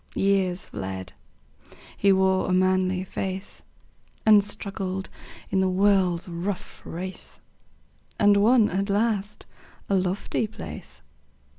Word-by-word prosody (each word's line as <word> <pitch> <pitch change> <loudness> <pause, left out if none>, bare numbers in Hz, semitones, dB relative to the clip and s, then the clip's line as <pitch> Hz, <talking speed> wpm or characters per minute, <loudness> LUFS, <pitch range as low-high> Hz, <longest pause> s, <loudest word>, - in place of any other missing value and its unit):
Years 190 -2 +1
fled; 95 0 -6 0.8
he 200 - +3
wore 190 -1 +2
a - - +2
manly 185 0 +2
face, 190 +1 -5 0.6
And 210 -2 +7
struggled 195 -2 -3 0.4
in 190 - +2
the 190 - +2
world's 185 -2 +2
rough 180 +3 -5
race, 185 +3 -7 0.8
And 205 -1 +5
won 220 +2 +5
at 195 +3 -1
last 210 0 -1 0.4
a - - +1
lofty 190 +3 0
place. 215 - -9
190 Hz, 110 wpm, -25 LUFS, 185-200 Hz, 0.8 s, And